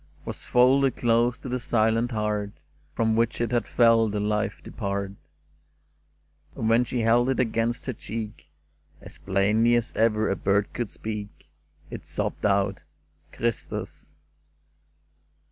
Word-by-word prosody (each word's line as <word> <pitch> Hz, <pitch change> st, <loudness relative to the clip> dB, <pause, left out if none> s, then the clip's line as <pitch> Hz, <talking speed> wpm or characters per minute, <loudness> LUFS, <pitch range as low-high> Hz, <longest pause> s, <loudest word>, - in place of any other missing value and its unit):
l66 -, -, -31 dB
"CHRISTUS!" -, -, -30 dB
Was -, -, -6 dB
folded 130 Hz, +1 st, +4 dB
close 120 Hz, +1 st, +2 dB
to -, -, -8 dB
the 125 Hz, 0 st, -2 dB
silent 115 Hz, 0 st, +1 dB
heart 105 Hz, -2 st, -1 dB, 0.5 s
From 110 Hz, -1 st, +1 dB
which 115 Hz, +1 st, +1 dB
it 120 Hz, 0 st, -1 dB
had 120 Hz, -3 st, 0 dB
felt 115 Hz, -2 st, +4 dB
the 105 Hz, -, -1 dB
life 105 Hz, 0 st, -1 dB
depart; 100 Hz, 0 st, -3 dB, 1.4 s
And 115 Hz, -4 st, -2 dB
when 115 Hz, +2 st, +4 dB
she 120 Hz, 0 st, -2 dB
held 120 Hz, +3 st, +3 dB
it 135 Hz, -, 0 dB
against 115 Hz, 0 st, 0 dB
her 130 Hz, -, -2 dB
cheek, 110 Hz, -3 st, -7 dB, 0.5 s
As -, -, -13 dB
plainly 105 Hz, +5 st, +2 dB
as 120 Hz, -1 st, 0 dB
ever 110 Hz, -1 st, +2 dB
a -, -, +1 dB
bird 100 Hz, +1 st, 0 dB
could 120 Hz, -4 st, -3 dB
speak 105 Hz, -7 st, -7 dB, 0.4 s
It -, -, -8 dB
sobbed -, -, -2 dB
out, 100 Hz, -1 st, 0 dB, 0.2 s
' -, -, -39 dB
Christus 115 Hz, -2 st, -4 dB
115 Hz, 145 wpm, -26 LUFS, 105-120 Hz, 1.4 s, folded